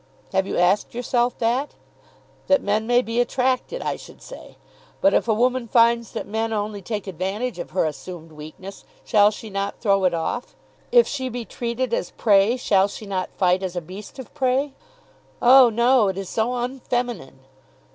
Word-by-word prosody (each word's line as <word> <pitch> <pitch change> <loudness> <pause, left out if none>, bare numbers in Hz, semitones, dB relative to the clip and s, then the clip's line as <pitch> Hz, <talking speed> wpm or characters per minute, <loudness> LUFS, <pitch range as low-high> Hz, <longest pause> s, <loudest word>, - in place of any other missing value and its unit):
Have 190 0 +1
you - - -3
asked 180 +6 +2
yourself 245 0 0
that? 245 +5 -1 0.7
That 285 - +3
men 215 +2 0
may 245 +1 +3
be 230 +1 0
attracted, 255 - -1
I - - -2
should - - -14
say. - - -12 0.4
But 290 - +3
if - - +2
a 225 - +3
woman 250 +1 +1
finds 235 0 +3
that - - -4
men 225 +2 -2
only 210 -1 -3
take 210 +1 -4
advantage 195 +5 -3
of - - -6
her 185 - 0
assumed 165 +2 -7
weakness, 155 +6 -10 0.2
shall 205 -2 +5
she 215 0 -9
not 200 +1 -3
throw 195 -3 +2
it 175 -2 +2
off? 165 +9 -4 0.4
If 480 -1 +6
she 260 -3 -3
be 240 -1 -5
treated 235 +1 -3
as - - -1
prey, 205 +2 +3
shall 200 -5 +3
she 205 +1 -9
not 190 -2 -3
fight 185 -1 +2
as 185 -2 -4
a - - 0
beast 190 - -11
of 260 - -10
prey? 270 0 0 0.7
Oh, 255 0 +7
no; 235 0 +3
it 190 -1 -2
is 195 -2 -5
so 235 +3 -1
unfeminine! 245 - -3
225 Hz, 180 wpm, -23 LUFS, 195-245 Hz, 0.7 s, Oh